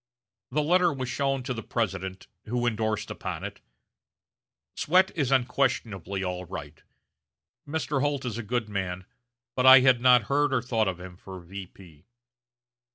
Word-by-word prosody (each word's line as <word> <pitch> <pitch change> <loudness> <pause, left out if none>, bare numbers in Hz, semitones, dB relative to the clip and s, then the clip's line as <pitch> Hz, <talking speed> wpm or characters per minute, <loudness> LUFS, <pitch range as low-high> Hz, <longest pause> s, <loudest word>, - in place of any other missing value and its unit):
The 150 +4 0
letter 175 +2 +3
was 130 -3 -4
shown 135 -1 -1
to 125 0 -3
the 115 - -5
President, 95 -5 -3 0.2
who 120 +2 -1
indorsed 110 -2 -1
upon - - -5
it: - - -7 1.1
"Swett 185 +4 +3
is 140 -6 0
unquestionably 115 -7 0
all 90 -1 -3
right. 80 -4 -8 0.9
Mr. 145 -2 -1
Holt 145 -2 -1
is 120 -2 -3
a - - -2
good 120 +1 -2
man, 95 -3 -4 0.5
but 130 0 +3
I 130 0 +10
had 130 -2 +4
not 125 -2 +6
heard 140 +4 +1
or 125 - +2
thought 115 -4 0
of 90 -2 -3
him 90 -1 -10
for 95 0 -10
V. 90 -3 -12
120 Hz, 155 wpm, -27 LUFS, 95-135 Hz, 1.1 s, I